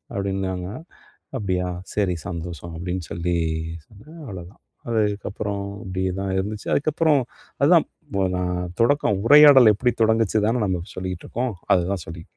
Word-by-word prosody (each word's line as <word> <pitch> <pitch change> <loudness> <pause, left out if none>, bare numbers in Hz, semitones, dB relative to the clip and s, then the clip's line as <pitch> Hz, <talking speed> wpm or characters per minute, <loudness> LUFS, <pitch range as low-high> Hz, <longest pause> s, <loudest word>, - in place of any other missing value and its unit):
அப்டின்னாங்க. 95 -2 -2 0.7
"அப்டியா, 90 -4 -1 0.3
சரி 95 -4 +1
சந்தோஷம்" 85 -1 -6
அப்டின்னு 90 0 -4
சொல்லி 85 +1 -1 0.5
சொன்னேன், 150 +11 -15
அவ்ளோதான். 90 0 -10 0.3
அதுக்கப்புறம் 105 -2 -1 0.2
இப்டியே 95 0 -2
தான் 95 -1 -2
இருந்துச்சு. 105 +2 -4
அதுக்கப்புறம், 155 0 +2 0.4
அதான் - - +5 0.5
நான், 90 0 -1 0.2
தொடக்கம் 115 -5 +2
உரையாடல் 140 -4 +9
எப்டி 125 +4 +1
தொடங்குச்சுன்தான 110 +1 +2
நாம 90 -3 -1
சொல்லிகிட்டுருக்கோம். 95 +6 -4 0.2
அதுதான் 90 -1 -1
சொல்லி. 85 +1 -8
100 Hz, 110 wpm, -23 LUFS, 90-110 Hz, 0.7 s, உரையாடல்